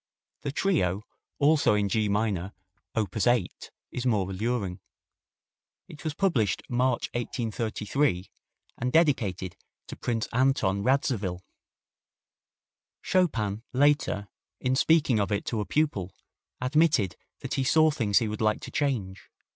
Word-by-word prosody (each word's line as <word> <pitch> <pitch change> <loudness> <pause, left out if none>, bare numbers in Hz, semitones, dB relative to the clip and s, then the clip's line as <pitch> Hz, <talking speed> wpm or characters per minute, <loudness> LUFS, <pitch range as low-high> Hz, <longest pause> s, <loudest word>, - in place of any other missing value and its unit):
The 140 - -3
trio, 110 - +1 0.3
also 145 -6 +4
in 105 -1 +1
G 105 +1 +1
minor, 100 -2 -1 0.4
op. 105 -5 -1
8, 115 -3 0 0.2
is 125 - -4
more 105 -7 +1
alluring. 100 -2 -2 1.1
It 150 - -12
was 155 -2 -3
published 140 - +1
March, 125 0 +1
1833, 115 -2 -1 0.5
and 125 +1 -1
dedicated 110 - +1 0.3
to - - -8
Prince 115 -1 -2
Anton 125 -6 +2
Radziwill. 105 -7 0 1.6
Chopin 115 - +1
later, 140 -7 +2 0.3
in 130 0 0
speaking 140 -5 +3
of 100 +1 0
it 100 - -1
to 110 -3 -1
a - - -3
pupil, 105 - 0 0.5
admitted 135 - +2 0.3
that - - -4
he 135 - 0
saw 155 +4 +4
things 110 -9 +1
he 115 - +3
would 105 +1 -4
like 105 -1 +1
to - - -8
change. 110 -10 -2
115 Hz, 125 wpm, -27 LUFS, 100-140 Hz, 1.6 s, also